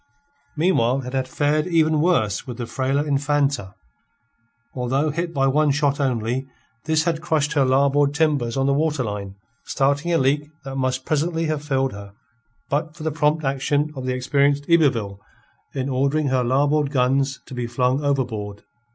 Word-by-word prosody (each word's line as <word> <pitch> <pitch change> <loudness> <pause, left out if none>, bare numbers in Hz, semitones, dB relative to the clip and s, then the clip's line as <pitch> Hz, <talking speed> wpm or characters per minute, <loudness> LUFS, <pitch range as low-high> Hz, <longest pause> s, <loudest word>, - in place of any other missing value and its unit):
Meanwhile 135 -6 +2
it 125 - -7
had 130 -1 -1
fared 150 +4 0
even 160 -3 +2
worse 125 - +1
with 125 -2 -6
the 120 - -4
frailer 135 +5 -1
Infanta. 140 -7 0 1.0
Although 135 +4 0
hit 170 +3 -3
by 135 -4 +1
one 150 +3 +3
shot 145 0 +1
only, 125 0 -1 0.4
this 155 0 +2
had 165 -1 -1
crushed 155 -3 0
her 145 -3 +3
larboard 140 +2 +2
timbers 145 -6 +1
on 135 - +1
the 140 - +2
waterline, 120 -11 -2 0.3
starting 140 +5 0
a 170 - +3
leak 145 +2 +1
that 135 0 -6
must 130 -1 -1
presently 165 +2 0
have 155 -2 -2
filled 135 -2 0
her, 100 0 -10 0.5
but 155 +2 -2
for 165 - -9
the 160 - -1
prompt 150 +1 +1
action 145 +2 0
of 130 -1 -5
the 130 - 0
experienced 140 +2 +1
Yberville 120 -12 +2 0.6
in 135 -1 -2
ordering 140 +2 0
her 130 -1 +1
larboard 145 +4 +2
guns 135 0 +1
to - - -11
be 125 -1 -3
flung 125 +4 0
overboard. 115 -8 -2
140 Hz, 165 wpm, -22 LUFS, 130-150 Hz, 1.0 s, one